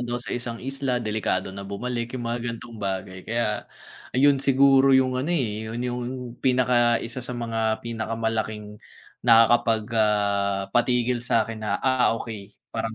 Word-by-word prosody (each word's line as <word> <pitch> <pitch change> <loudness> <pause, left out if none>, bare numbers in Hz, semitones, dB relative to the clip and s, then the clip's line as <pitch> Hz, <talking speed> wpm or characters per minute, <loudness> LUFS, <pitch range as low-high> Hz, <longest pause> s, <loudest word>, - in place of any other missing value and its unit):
daw 120 - -1
sa 120 - -4
isang 120 -1 -3
isla, 135 0 -2
delikado 105 -3 -1
na 100 0 -8
bumalik, 120 +4 -4
'yong 120 - -5
mga 120 +1 -2
ganitong 115 -1 -7
bagay. 95 -1 -4
Kaya, 115 -2 -1 0.5
ayun 140 +1 +4
siguro 135 0 +5
'yong 130 -1 +2
ano, 145 - -3
eh, 110 -10 -1
'yon 120 +2 -4
'yong 125 0 -3 0.4
pinaka-isa 120 -2 +2
sa 125 0 -4
mga 115 -2 -1
pinakamalaking 110 -2 -3 0.4
nakakapag, 115 -1 +4 0.2
ah, 100 -2 +1
patigil 120 0 +2
sa'kin 115 -2 0
na, 110 - -1
"Ah, 130 -3 +3
okay. 105 -4 -7 0.2
Parang, 115 0 -3
115 Hz, 145 wpm, -25 LUFS, 110-125 Hz, 0.5 s, siguro